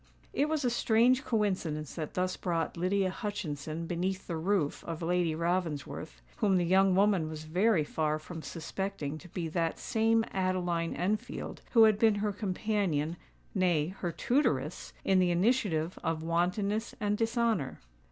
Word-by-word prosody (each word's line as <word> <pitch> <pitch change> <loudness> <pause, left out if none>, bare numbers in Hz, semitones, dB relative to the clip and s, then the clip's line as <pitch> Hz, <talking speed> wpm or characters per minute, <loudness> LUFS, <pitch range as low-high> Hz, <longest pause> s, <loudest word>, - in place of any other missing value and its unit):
It 290 +2 +1
was 310 -4 0
a 245 - +2
strange 240 +2 +3
coincidence 185 - -1
that 155 -3 -5
thus 185 0 0
brought 165 -2 -2
Lydia 185 +2 +1
Hutchinson 165 -6 -4
beneath 185 +3 -2
the 170 - -3
roof 160 -2 0
of 165 0 -5
Lady 175 -1 +1
Ravensworth, 160 - -2
whom 195 -3 +3
the 175 - +2
young 190 +1 +4
woman 195 -5 +3
was 155 -1 -6
very 180 +3 +2
far 155 0 -1
from 160 +2 -8
suspecting 165 -2 -4
to 180 - -13
be 170 0 -3
that 165 0 -1
same 225 0 +2
Adeline 180 -3 0
Enfield 205 +4 -3
who 230 -3 +8
had 215 -2 +5
been 220 -2 +5
her 205 0 0
companion—nay, 180 -4 -1
her 175 - -2
tutoress—in 180 - 0
the 180 -1 +3
initiative 175 -3 +1
of 165 -2 -1
wantonness 200 +8 0
and 210 -2 +1
dishonour. 225 - 0
180 Hz, 145 wpm, -31 LUFS, 165-210 Hz, -, who